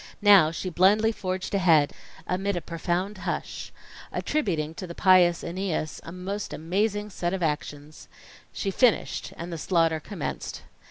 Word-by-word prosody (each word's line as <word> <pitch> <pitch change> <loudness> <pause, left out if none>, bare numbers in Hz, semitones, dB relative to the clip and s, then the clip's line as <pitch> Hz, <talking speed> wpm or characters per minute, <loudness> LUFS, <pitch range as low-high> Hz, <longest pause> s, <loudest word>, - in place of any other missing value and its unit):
Now, 200 -7 +7
she 180 +3 -4
blindly 205 +6 +4
forged 185 -3 -4
ahead, 165 -7 +4 0.3
amid 195 +2 -1
a 175 - -2
profound 175 +5 -2
hush - - -4 0.4
attributing 165 - -1
to 185 +2 -7
the 170 - -8
Pious 180 -2 +5
Æneas 175 -3 -3
a 165 - -9
most 190 +3 -5
amazing 205 +5 -1
set 175 0 -2
of 185 - -3
actions. 150 -1 -4 0.4
She 195 - -2
finished; 240 +3 +1
and 170 +1 -6
the 165 - -5
slaughter 165 -2 +2
commenced. 170 0 -5
180 Hz, 145 wpm, -26 LUFS, 165-200 Hz, 0.4 s, Now